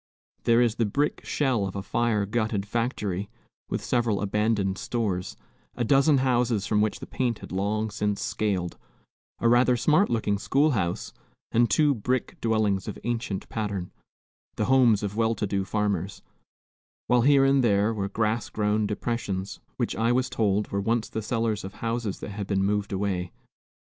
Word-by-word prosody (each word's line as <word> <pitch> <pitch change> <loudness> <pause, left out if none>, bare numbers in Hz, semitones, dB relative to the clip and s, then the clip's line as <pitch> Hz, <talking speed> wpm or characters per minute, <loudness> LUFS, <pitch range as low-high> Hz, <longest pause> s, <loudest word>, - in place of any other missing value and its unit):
There 115 0 +5
is 115 -2 0
the 115 - +2
brick 145 +8 -1
shell 125 -9 0
of 95 - -7
a 100 - -3
fire 110 0 0
gutted 110 -1 -1
factory, 105 -4 -2 0.4
with - - -2
several 120 -4 +1
abandoned 105 -1 0
stores, 100 -7 -2 0.4
a 120 - -1
dozen 140 +4 +4
houses 120 -5 +1
from 105 0 +2
which 110 0 -1
the - - -5
paint 120 -4 -1
had - - -11
long 105 +3 -1
since 105 0 -1
scaled, 95 -5 -2 0.6
a 115 - +1
rather 120 +1 +4
smart 155 - +3
looking 105 -3 0
schoolhouse, 110 - 0 0.4
and 120 0 +3
two 145 +7 +4
brick 125 +2 -2
dwellings 110 -4 +1
of - - -5
ancient 115 -5 -3
pattern, 100 -5 -3 0.6
the 105 - 0
homes 120 -5 +4
of 100 0 -3
well 115 0 +1
to 105 - -2
do 100 -1 -1
farmers; 100 -2 -2 0.8
while 125 0 +3
here 135 +1 +5
and 135 -1 +4
there 105 0 +3
were 100 -2 -2
grass 110 +1 -1
grown 105 0 0
depressions, 105 -3 -3 0.2
which - - -1
I 115 +1 +1
was 130 +1 +1
told 105 -3 +1
were 100 - -1
once 115 +2 0
the 110 - -3
cellars 110 -1 -1
of 95 +1 -8
houses 115 -3 -3
that - - -6
had 100 -1 -5
been 95 -1 +1
moved 100 0 0
away. 95 -3 -2
110 Hz, 170 wpm, -26 LUFS, 100-120 Hz, 0.8 s, There